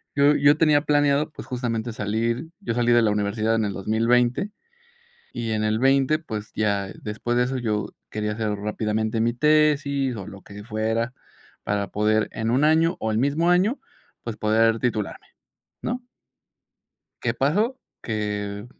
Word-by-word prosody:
Yo 145 +1 +5
yo 145 +1 +5
tenía 155 -2 +4
planeado, 145 0 +2
pues, - - -10
justamente 120 -2 -3
salir 115 +7 -1
yo 115 - -2
salí 120 0 +2
de 120 - +5
la 110 - +3
universidad 105 +2 0
en 110 -1 +1
el 100 - -2
2020. 120 - +1 0.8
Y 115 -2 -3
en 110 0 0
el 110 0 +1
20, 135 +3 +3
pues, 110 -9 -6
ya 100 -2 0
después 110 +3 -2
de 125 - +4
eso 130 +1 -2
yo 110 -4 -2 0.2
quería 105 0 -2
hacer 110 0 -2
rápidamente 110 +1 -1
mi 120 +1 +1
tesis, 140 -2 +2
o, 100 -1 -7
lo 100 -2 -10
que 105 0 -10
fuera 110 +2 -1 0.5
para 100 -1 -1
poder 110 +1 +1
en 110 +1 -2
un 130 +4 +2
año, 160 +2 +4
o, 110 - -1
el 110 - 0
mismo 145 +6 +2
año, 195 +9 +2 0.4
pues, 115 -2 -5
poder 110 +1 +3
titularme, 110 -5 -2 0.6
¿no? 245 +1 -3 1.2
¿Qué - - 0
pasó? 210 - +1 0.2
Que, 105 -2 -3
115 Hz, 160 wpm, -24 LUFS, 110-140 Hz, 1.2 s, Yo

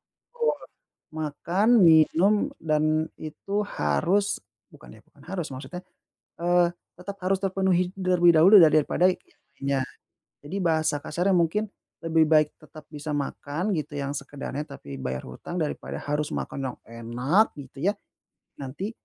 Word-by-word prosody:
betul, 485 0 -2 0.6
makan, 165 +7 -1
minum 165 +4 +5 0.3
dan 155 0 +1
itu 200 +7 -3
harus 185 - 0 0.3
bukan - - -15
ya, - - -21
bukan - - -21
harus 175 -3 -4
maksudnya, 180 +7 -8 0.6
eee, 175 0 +3 0.3
tetap 200 +2 -7
harus 190 +1 +2
terpenuhi 190 -2 +1
terlebih 180 -3 +4
dahulu 190 +7 +8
ya, 160 - +8
daripada 155 +4 +3
yang - - -4 0.4
lainnya. 140 -1 0 0.6
Jadi 165 +7 -5
bahasa 160 -3 +1
kasarnya 175 +5 0
mungkin 195 +6 +1 0.3
lebih 160 -1 +3
baik 155 -1 +5
tetap 155 0 -14
bisa 150 0 -5
makan 145 +6 -3
gitu, 150 -1 -4
yang 140 -1 -3
sekedarnya, 140 0 -6
tapi 70 - -9
bayar 65 0 -4
utang, 65 - -8
daripada 150 - -4
harus 150 +1 -2
makan - - -4
yang - - -17
enak 120 - +1
gitu 140 +3 -7
ya, 205 - 0 0.6
nanti 145 - -5
160 Hz, 140 wpm, -26 LUFS, 145-185 Hz, 0.6 s, dahulu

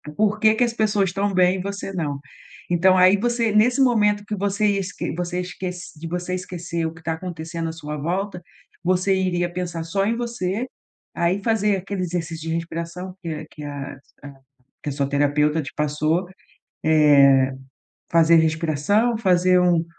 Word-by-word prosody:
por 210 +2 +1
que 215 0 +5
que 245 - +2
as 240 - +1
pessoas 210 -4 +1
estão 200 +2 -1
bem 185 0 +3
e - - -2
você 200 0 -5
não. 150 -6 -2 0.5
Então 185 +2 +4
aí 185 +2 +6
você 235 0 0
nesse 235 +6 +3
momento 210 -5 +3
que 210 0 -3
você 200 +2 0
ia 200 -1 +1
esque 185 -2 -4
você 175 +1 -3
esquec 180 0 -5 0.2
de 160 +2 -7
você 180 +2 -3
esquecer 175 -2 -4
o 160 - -3
que 160 - -15
está 160 0 -2
acontecendo 165 -1 -5
à - - -3
sua 150 -2 -6
volta, 180 +4 -3 0.4
você 185 +2 +2
iria 175 -2 0
pensar 175 -2 -4
só 195 +4 -1
em 230 - +1
você. 235 -1 -3 0.5
Aí 180 +4 +1
fazer 210 -3 +2
aquele 190 +1 -4
exercício 165 -2 -4
de 165 - 0
respiração 170 +2 -5
que 170 - -5
a 155 0 -5
que 150 - -11
a 145 -2 -6 0.9
que - - -4
a - - -3
sua 140 0 -1
terapeuta 150 +2 +1
te 135 - -8
passou, 155 +4 0
eh, - - -16 1.8
fazer 165 0 +5
respiração, 160 +8 +2
fazer 185 -3 +3
um 175 -2 +3
180 Hz, 175 wpm, -22 LUFS, 165-200 Hz, 1.8 s, aí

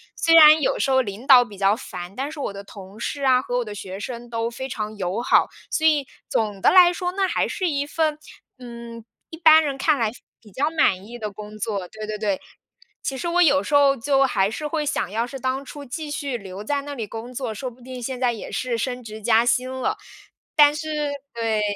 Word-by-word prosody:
虽 330 - +2
然 310 -1 +9
有 - - 0
时 - - +1
候 260 0 +4
领 220 +2 -7
导 255 -3 +9
比 205 -4 -13
较 195 +1 +3
烦， 180 -6 -8
但 275 +5 -3
是 310 - -9
我 240 - -3
的 200 0 -8
同 200 0 -12
事 280 +4 -4
啊， 255 -1 +4
和 245 -2 -3
我 245 - -1
的 210 -1 -7
学 190 -1 -7
生 240 +3 -7
都 230 0 -2
非 250 +3 -6
常 215 -2 -4
友 190 +3 -2
好。 245 - +4 0.3
所 315 - -1
以 295 -4 +3 0.2
总 210 -3 -1
的 - - +5
来 360 -1 +7
说 355 0 -3
那 385 +1 0
还 - - 0
是 375 -3 -2
一 285 -2 -1
份， 310 0 0 0.4
嗯， 235 -2 -9 0.3
一 320 - -9
般 320 -1 +7
人 280 -3 -3
看 290 +1 +2
来 225 -2 +1 0.3
比 215 -2 -17
较 285 +9 0
满 200 - +1
意 240 +3 -9
的 215 -2 -3
工 210 +1 -10
作。 200 -3 -3
对 215 -1 -8
对 215 0 -4
对， 205 -3 -1 0.6
其 270 - -3
实 340 - -4
我 350 +1 +2
有 280 -4 +5
时 295 - -1
候 280 -1 +5
就 275 +3 +2
还 195 -6 +1
是 300 +8 -5
会 300 0 -2
想 190 -9 -2
要 230 +3 -1
是 270 - -7
当 260 +1 -2
初 290 +2 -9
继 295 +4 -6
续 285 -3 -3
留 195 -1 -9
在 280 +5 -1
那 290 0 -6
里 230 -5 -4
工 225 +4 -8
作， 250 -3 -4
说 255 +5 -5
不 250 +1 -19
定 255 0 -8
现 255 +1 -4
在 250 -2 +2
也 225 - -7
是 250 -2 -2
升 250 +2 -3
职 220 -1 -9
加 225 +1 +3
薪 250 +1 +1
了。 260 +12 -2 0.6
但 295 -2 +7
是 310 +1 -5 0.5
对， 225 -2 0
250 Hz, 255 characters per minute, -23 LUFS, 215-285 Hz, 0.6 s, 然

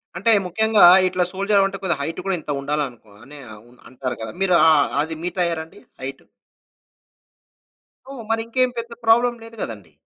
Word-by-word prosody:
అంటే 225 +6 +2
ముఖ్యంగా 220 +4 +2 0.2
ఇట్లా 180 0 0
సోల్జర్ 200 +2 0
అవ్వాలంటే 195 0 +1
కొద్ది 175 -4 0
హైట్ 165 +4 -4
కూడా 195 -1 0
ఇంత 150 - -14
ఉండాలనుకో 135 -7 -4
అనే 145 +2 -13 0.3
ఉన్ 125 - -22
అంటారు 130 -1 -5
కదా! 110 -1 -5
మీరు 180 -2 +3
ఆ! - - +7 0.3
అ - - +1
అది 160 0 -6
మీటయ్యారాండి? 170 -3 -3 0.2
హైటు? 135 +1 -7 1.9
ఓహ్! 260 -4 -8
మరింకేం 230 +3 0
పెద్ద 235 0 -5
ప్రాబ్లమ్ 240 +1 +3
లేదు 230 0 -13
గదండి. 100 -8 -7
180 Hz, 155 wpm, -21 LUFS, 140-220 Hz, 1.9 s, ఆ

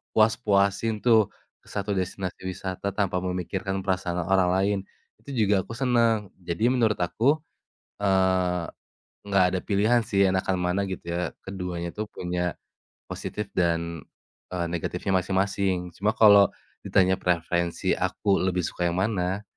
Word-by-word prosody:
puas-puasin 110 -1 +2
tuh 110 -4 +4 0.3
1 100 0 -4
destinasi 95 0 -3
wisata 95 +1 -4
tanpa 95 -3 0
memikirkan 95 +1 -3
perasaan 90 -2 -1
orang 95 -1 +3
lain 100 +1 +2 0.4
itu 125 -7 -1
juga 100 -1 +3
aku 115 +3 -9
seneng. 115 -5 +1
Jadi 90 +8 0
menurut 115 -4 +2
aku, 120 - +2 0.6
eee, 95 -3 +1 0.6
nggak 100 -2 +3
ada - - -2
pilihan 110 +4 +3
sih 100 0 +3
enakan 95 0 0
mana 90 +2 0
gitu 95 - -6
ya, 85 +1 -2
keduanya 90 -3 -4
tuh 105 - -2
punya 90 -1 -3 0.5
positif 105 -1 -5
dan, 85 -2 0 0.5
eee, 85 -1 -1
negatifnya 90 +3 -2
masing-masing. 95 -1 0
Cuma 105 +6 0
kalau 100 -3 +8 0.4
ditanya 95 -1 +3
preferensi 85 0 0
aku 100 -2 +1
lebih 90 -1 0
suka 90 +1 -2
yang 85 - 0
mana, 95 -2 -1
95 Hz, 130 wpm, -26 LUFS, 90-105 Hz, 0.6 s, kalau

